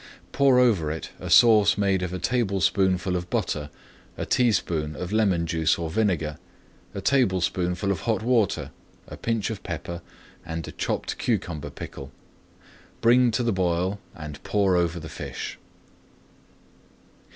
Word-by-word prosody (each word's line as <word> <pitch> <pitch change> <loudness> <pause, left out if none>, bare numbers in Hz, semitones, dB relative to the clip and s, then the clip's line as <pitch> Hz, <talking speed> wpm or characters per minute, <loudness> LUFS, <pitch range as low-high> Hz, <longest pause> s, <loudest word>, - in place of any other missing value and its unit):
Pour 135 -2 +4
over 110 -11 +3
it 80 +1 -5
a - - -6
sauce 105 -4 +6
made 100 -2 +1
of 90 -1 -3
a 90 - -3
tablespoonful 95 -5 +1
of 90 0 -3
butter, 75 -1 -2 0.5
a - - -3
teaspoonful 85 -10 +1
of 90 +1 -4
lemon 95 -6 +2
juice 80 -1 +1
or 80 -2 -4
vinegar, 80 -7 0 0.6
a - - -3
tablespoonful 95 -6 +1
of 95 - -1
hot 110 +2 -1
water, 115 -5 +1 0.4
a - - -8
pinch 115 -2 -1
of 105 - -6
pepper, 85 +1 -5 0.4
and 80 -1 -5
a - - -6
chopped - - -3
cucumber 75 -4 -2
pickle. 70 0 -9 0.9
Bring 120 +1 +5
to 115 +2 0
the 115 -2 +1
boil 90 +2 0 0.2
and 75 -2 -8
pour 100 -3 +2
over 85 -1 +1
the 80 - -8
fish. - - -6
95 Hz, 140 wpm, -25 LUFS, 85-110 Hz, 0.9 s, sauce